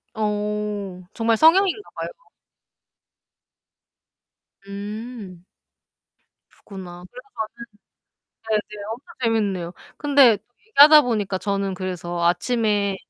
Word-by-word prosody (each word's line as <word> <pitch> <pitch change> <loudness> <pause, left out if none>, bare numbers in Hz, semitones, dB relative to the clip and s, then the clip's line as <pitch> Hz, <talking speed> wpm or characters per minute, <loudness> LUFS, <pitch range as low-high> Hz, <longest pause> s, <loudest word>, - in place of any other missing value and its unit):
어. 210 -3 -3
정말 225 -1 +1
성향인가 380 - +4
봐요. - - -4 2.6
음. 205 -2 -8 1.1
그렇구나. 180 -3 -11
그래 250 - -10 1.2
가지고 220 -1 -2 0.2
네네. 205 -1 -8
엄청 250 +5 -10 0.2
재밌네요. 200 -6 0 0.2
근데 275 -7 +5 0.3
얘기하다 300 -5 +8
보니까 205 -6 -1
저는 195 -1 -2
그래서 175 -2 -4
아침에 205 +2 +1
210 Hz, 200 characters per minute, -22 LUFS, 190-230 Hz, 2.6 s, 얘기하다